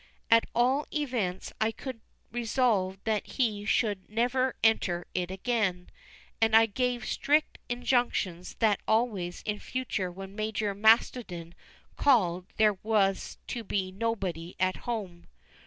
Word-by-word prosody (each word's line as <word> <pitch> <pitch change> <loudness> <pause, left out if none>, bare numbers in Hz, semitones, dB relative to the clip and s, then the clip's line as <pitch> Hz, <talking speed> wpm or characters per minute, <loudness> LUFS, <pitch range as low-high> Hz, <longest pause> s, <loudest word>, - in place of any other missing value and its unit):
At 230 0 +6
all 260 +5 +2
events 240 - -2
I 220 - +3
could 245 0 -7 0.3
resolve 225 -5 +1
that 215 -2 0
he 215 -6 0
should 205 -3 0
never 245 +4 +1
enter 180 -6 +2
it 180 -1 -1
again; 190 -3 -1 0.5
and 225 0 +4
I 225 0 +8
gave 245 +1 -1
strict 300 +2 +1
injunctions 240 -8 0
that 215 -3 +2
always 215 -6 0
in 210 -1 -2
future 230 -8 -3
when 195 +2 -9
Major 215 -1 -1
Mastodon 205 -5 +2 0.4
called 185 -10 +3
there 210 -3 +3
was 205 -3 +1
to 240 -2 -3
be 190 -2 -2
"nobody 190 -5 -3
at 185 0 +1
home." 190 -7 -4
215 Hz, 125 wpm, -29 LUFS, 190-240 Hz, 0.5 s, I